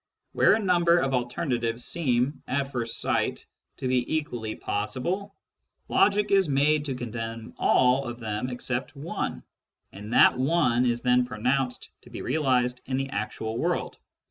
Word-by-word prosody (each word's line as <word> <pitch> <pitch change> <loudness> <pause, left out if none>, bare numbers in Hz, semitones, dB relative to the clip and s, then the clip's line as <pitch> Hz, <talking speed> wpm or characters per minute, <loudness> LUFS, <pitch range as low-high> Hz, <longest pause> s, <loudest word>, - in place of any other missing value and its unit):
Where - - +4
a - - -1
number 175 -4 +3
of 135 -5 0
alternatives 120 -2 -1
seem, 135 -4 0
at 135 +1 -1
first 115 -3 -3
sight, - - -1 0.3
to 130 - -3
be 125 +3 0
equally 120 -8 -3
possible, 170 - -3 0.5
logic 210 0 +3
is 195 -4 +4
made 145 +2 +2
to 135 -3 -2
condemn 115 -1 -6
all 130 +2 +3
of 120 0 -5
them 110 +2 -3
except 125 +2 -4
one, 150 +5 -4 0.5
and 105 +3 -9
that - - +6
one 130 -4 +2
is 120 0 -1
then 125 0 +4
pronounced 125 +2 -1
to - - -16
be - - -7
realised 125 -3 +1
in 130 0 -1
the 135 0 -3
actual 110 +2 -3
world. - - -2
125 Hz, 150 wpm, -26 LUFS, 120-145 Hz, 0.5 s, that